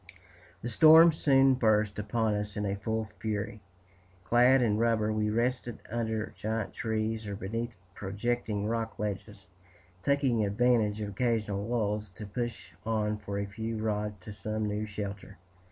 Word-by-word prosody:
The 120 - -2
storm 160 +7 +8
soon 135 -3 +4
burst 110 -4 +2
upon 110 +1 0
us 105 0 -3
in 100 -1 -1
full 110 +1 -2
fury. 105 -1 -3 0.6
Clad 125 +4 +5
in 105 -2 +2
rubber, 110 -2 +2
we 105 0 0
rested 120 +1 -1
under 110 -2 -2
giant 110 -1 -3
trees, 110 0 -2
or 100 - -4
beneath 115 +4 -4 0.2
projecting 105 +1 -2
rock 115 0 -2
ledges, 105 0 -5 0.6
taking 135 -3 +2
advantage 110 0 +2
of 105 - -3
occasional 105 -2 -1
lulls 105 -3 -1
to 105 - -7
push 115 -3 -4
on 105 -1 0
for 100 -1 -5
a 100 - -1
few 110 +2 -4
rods 105 -1 -1
to 105 - -8
some 110 +1 -3
new 105 +1 -2
shelter. 100 -1 -6
110 Hz, 145 wpm, -30 LUFS, 105-115 Hz, 0.6 s, storm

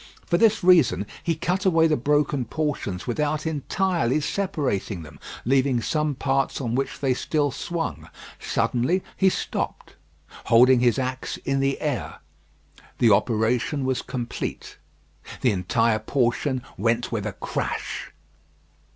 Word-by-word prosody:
For 170 - +1
this 220 -3 +4
reason 155 - +5 0.2
he 165 - 0
cut 180 +5 -1
away 165 -4 +4
the 155 -1 +3
broken 145 0 +1
portions 135 - -3
without 150 +5 -1
entirely 160 -2 0
separating 140 - -2
them, 75 -1 -13 0.3
leaving 130 0 +2
some 150 +4 -1
parts 135 +1 0
on 120 -4 -2
which 135 +2 -2
they 135 -2 +2
still 145 +2 0
swung. 170 +4 -4 0.3
Suddenly 160 +11 0
he 190 - +4
stopped, - - -4 0.5
holding 125 +2 +6
his 120 0 +3
axe 130 0 -3
in 135 0 +1
the 135 0 0
air. 145 -5 -3 0.8
The 115 -3 +4
operation 120 +6 +1
was 130 -1 0
complete. 120 -2 -5 0.6
The 125 - +3
entire 110 +4 +1
portion 125 +2 0 0.2
went 115 +3 +1
with 110 -3 -2
a 105 - -4
crash. - - -4
135 Hz, 130 wpm, -24 LUFS, 120-155 Hz, 0.8 s, holding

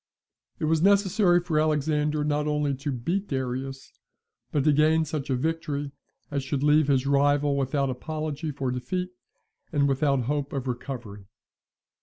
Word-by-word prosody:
It - - -2
was 160 0 +2
necessary 195 -1 +4
for 165 -3 0
Alexander 150 0 +1
not 150 0 0
only 150 -1 0
to 140 +2 -3
beat 170 - -2
Darius, 135 0 -4 0.6
but 145 - +1
to 150 0 +4
gain 155 +2 +3
such 150 -2 -4
a 130 - +2
victory 145 0 -2 0.4
as 140 -1 -1
should 135 +1 -2
leave 150 0 +4
his 135 -2 +2
rival 145 +1 +3
without 135 0 0
apology 155 +3 -4
for 135 -3 -2
defeat, 180 +9 -3 0.6
and 145 -3 +2
without 140 -1 +2
hope 140 +3 -2
of 135 -2 -3
recovery. 120 -5 -6
145 Hz, 150 wpm, -26 LUFS, 135-155 Hz, 0.6 s, necessary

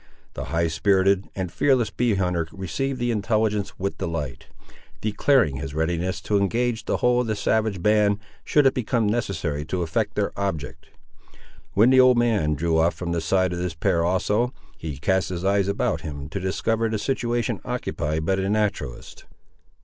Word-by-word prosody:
The - - -5
high 85 0 0
spirited 95 +4 +2
and 95 -3 -3
fearless 125 - +2
bee 120 -1 +1
hunter 90 -4 0
received 130 +8 -3
the 120 0 0
intelligence 110 -1 0
with 100 +1 -3
delight, 80 -2 -4 0.5
declaring 110 - +2
his 70 +1 -6
readiness 85 +3 -1
to 105 -1 +1
engage 115 +2 0
the - - 0
whole 125 0 +3
of 125 - -3
the 110 - 0
savage 105 -3 0
band, 105 -1 +3 0.3
should 145 -2 +3
it 135 - +5
become 120 -2 0
necessary 90 - -1
to 90 +3 -2
effect 80 -2 -1
their - - 0
object. 95 -8 -4 0.9
When 110 +6 +5
the 130 - +6
old 130 -1 +6
man 105 -11 +2
drew 80 +2 +1
off 85 +2 +2
from 85 -2 -4
the 85 -1 0
side 95 +2 +1
of 85 - -3
this 90 -2 -3
pair 85 0 +1
also, 105 +7 +1 0.2
he 75 -4 -6
cast 95 +6 +1
his 90 0 -4
eyes 100 0 +2
about 100 - 0
him 70 -2 -6
to 100 - -4
discover 110 +4 0
the 110 - -1
situation 120 0 -1
occupied 80 -11 -2
by 95 - +2
the 95 0 -1
naturalist. 100 - -2
100 Hz, 175 wpm, -24 LUFS, 85-110 Hz, 0.9 s, the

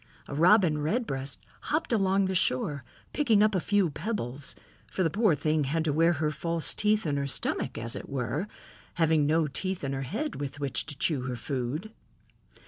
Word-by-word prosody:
A - - -7
Robin 170 0 +5
Redbreast 145 - -2 0.2
hopped 305 -4 0
along 195 -2 +3
the 190 - -1
shore, 140 -4 +1 0.3
picking 225 -8 +4
up 215 0 +3
a 185 - +2
few 195 -1 +2
pebbles, 145 - -3 0.4
for 190 - 0
the 165 - +1
poor 205 -3 +3
thing 155 0 +1
has 160 +4 0
to 155 -3 0
wear 165 +3 +4
her 155 -1 0
false 165 +1 -1
teeth 210 -1 +1
in 145 -2 0
her 140 0 -1
stomach, 135 - -1
as 115 +1 -3
it - - -7
were, 140 - -2 0.5
having 160 -3 +3
no 160 +1 +3
teeth 185 +5 -3
in 135 0 -2
her 135 - -2
head 225 - -3
with 145 0 -5
which 140 -1 0
to 145 -2 -6
chew 145 -4 +1
her 130 -1 -3
food. 135 - -3
155 Hz, 190 wpm, -28 LUFS, 140-190 Hz, 0.5 s, Robin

